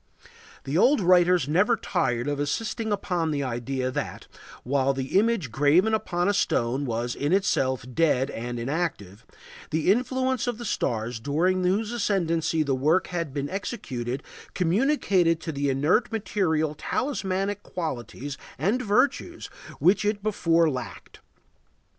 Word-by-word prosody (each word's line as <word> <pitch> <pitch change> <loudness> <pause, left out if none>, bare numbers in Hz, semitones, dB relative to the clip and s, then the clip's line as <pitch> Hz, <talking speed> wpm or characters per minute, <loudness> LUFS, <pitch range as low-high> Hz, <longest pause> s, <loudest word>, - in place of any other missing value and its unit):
The 145 +6 0
old 280 +8 +5
writers 180 -4 +4
are - - -3
never 205 +9 +4
tired 125 - -1
of 145 -1 -1
insisting 220 +9 -2
upon 180 -5 -1
the 145 -2 -1
idea 130 +1 -2
that, - - -4 0.4
while 135 +1 +1
the 135 +3 -4
image 210 - 0
graven 150 - +3
upon 175 -4 0
a 205 - +3
stone 130 -7 0
was 120 +1 -2
in 145 +3 -2
itself 135 -10 +1
dead 140 -3 +2
and 120 +1 -5
inactive, 120 - -3 0.5
the 160 +4 +2
influence 255 +2 0
of 240 -3 -1
the 240 - -7
stars 115 - -2
during 175 +9 +1
whose 205 +5 +1
ascendancy 170 -8 0
the 140 -2 0
work 155 +8 +2
had 170 -5 -3
been 140 0 -3
executed 135 - -4 0.3
communicated 185 - +2
to 160 - -4
the 140 -1 -1
inert 150 - +2
material 170 -8 0
talismanic 200 - -2
qualities 140 -3 -5 0.2
and 200 - +1
virtues 280 - 0 0.3
which 190 +4 +3
it 205 -1 -1
before 170 -6 +2
lacked. 130 -5 -6
165 Hz, 140 wpm, -26 LUFS, 135-205 Hz, 0.5 s, old